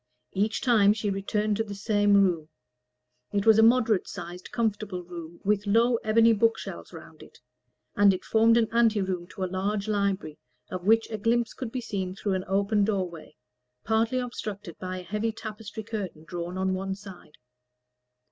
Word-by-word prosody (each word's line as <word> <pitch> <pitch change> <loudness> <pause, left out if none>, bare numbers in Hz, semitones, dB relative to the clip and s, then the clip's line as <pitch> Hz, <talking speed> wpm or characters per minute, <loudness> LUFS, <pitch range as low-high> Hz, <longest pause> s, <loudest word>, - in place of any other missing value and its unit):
Each 210 +3 0
time 215 -5 +5
she 210 -1 -2
returned 210 +2 -1
to 225 - +1
the 205 -2 -7
same 205 0 +2
room; 175 -6 +2 0.8
it 200 0 0
was 220 -1 +6
a - - +8
moderate 225 -3 +4
sized 175 +1 -8
comfortable 215 -6 -2
room, 170 -1 -9
with 205 0 +1
low 230 +3 +4
ebony 225 +1 +4
bookshelves 225 +1 -1
round - - -12
it, - - -15 0.6
and 205 -1 +6
it 185 -1 -4
formed 225 +1 +4
an 230 -1 +3
ante 230 -2 +3
room 185 -3 -2
to 190 - -6
a - - +2
large 195 +3 -2
library, 200 -7 -1 0.3
of 185 +1 -5
which 225 +1 +4
a 215 - -3
glimpse 230 +2 +1
could 250 -4 -6
be 255 - -3
seen 190 -5 -4
through 200 0 -2
an 185 0 -2
open 200 +2 +2
doorway, 185 -6 -3 0.5
partly 225 +3 +1
obstructed 210 -7 -5
by 185 0 -4
a 180 - -7
heavy 210 +5 -2
tapestry 220 0 -7
curtain 205 -8 -5
drawn 175 +2 -5
on 190 0 0
one 190 +1 -3
side. 190 -6 -13
205 Hz, 175 wpm, -27 LUFS, 185-225 Hz, 0.8 s, a